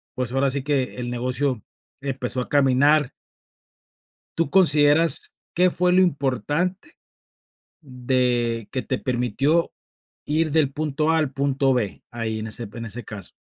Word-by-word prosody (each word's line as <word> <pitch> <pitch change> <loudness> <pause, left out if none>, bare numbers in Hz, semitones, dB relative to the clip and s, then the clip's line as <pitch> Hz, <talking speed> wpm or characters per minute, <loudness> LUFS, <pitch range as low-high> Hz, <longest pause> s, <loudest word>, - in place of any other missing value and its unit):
pues, 125 -2 -2
ahora 135 +1 +2
sí 135 0 -1
que 140 -3 -1
el 120 -1 -4
negocio 125 0 -2 0.4
empezó 130 -2 -2
a - - -7
caminar. 145 +1 +3 1.3
Tú 165 - +1
consideras, 155 -3 +4 0.2
¿qué 180 +1 +4
fue 180 +1 +1
lo 185 - +5
importante 165 - -1 0.9
de 125 -4 -1
que 130 - -2
te 130 - -2
permitió 130 +6 0 0.5
ir 155 +1 0
del 150 -3 +2
punto 155 +1 -1
A 165 - +3
al 150 -4 -1
punto 135 0 +1
B, 110 -6 -2
ahí 110 -2 -3
en 110 - -5
ese 115 0 -4
en 115 -1 -7
ese 115 +2 -7
caso? 100 -4 -8
135 Hz, 145 wpm, -23 LUFS, 125-150 Hz, 1.3 s, lo